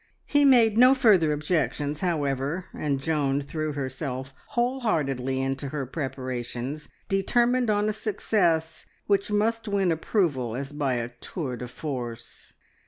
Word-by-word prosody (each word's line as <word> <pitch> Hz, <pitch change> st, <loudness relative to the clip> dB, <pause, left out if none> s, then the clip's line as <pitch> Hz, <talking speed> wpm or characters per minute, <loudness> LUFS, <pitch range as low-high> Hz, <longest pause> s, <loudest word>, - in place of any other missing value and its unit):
He 290 Hz, 0 st, +3 dB
made 230 Hz, -5 st, +5 dB
no 255 Hz, +2 st, +8 dB
further 200 Hz, -, +4 dB
objections, 150 Hz, -1 st, -1 dB
however, 150 Hz, 0 st, -1 dB
and 140 Hz, -3 st, -1 dB
Joan 140 Hz, -2 st, 0 dB
threw 155 Hz, +2 st, -3 dB
herself 135 Hz, -1 st, -4 dB
whole 245 Hz, +2 st, 0 dB
heartedly 135 Hz, -, 0 dB
into 135 Hz, +1 st, -2 dB
her 140 Hz, -1 st, -3 dB
preparations, 130 Hz, 0 st, -4 dB, 0.2 s
determined 240 Hz, +5 st, +2 dB
on 210 Hz, 0 st, +2 dB
a 215 Hz, -, 0 dB
success 175 Hz, -7 st, 0 dB, 0.2 s
which 200 Hz, 0 st, +1 dB
must 225 Hz, +2 st, 0 dB
win 195 Hz, -3 st, +1 dB
approval 155 Hz, -, 0 dB
as 135 Hz, +2 st, -4 dB
by 145 Hz, -3 st, -1 dB
a 120 Hz, -1 st, -2 dB
tour 125 Hz, +3 st, -5 dB
de 125 Hz, +1 st, -6 dB
force. 125 Hz, -3 st, -7 dB
150 Hz, 135 wpm, -26 LUFS, 135-205 Hz, 0.2 s, no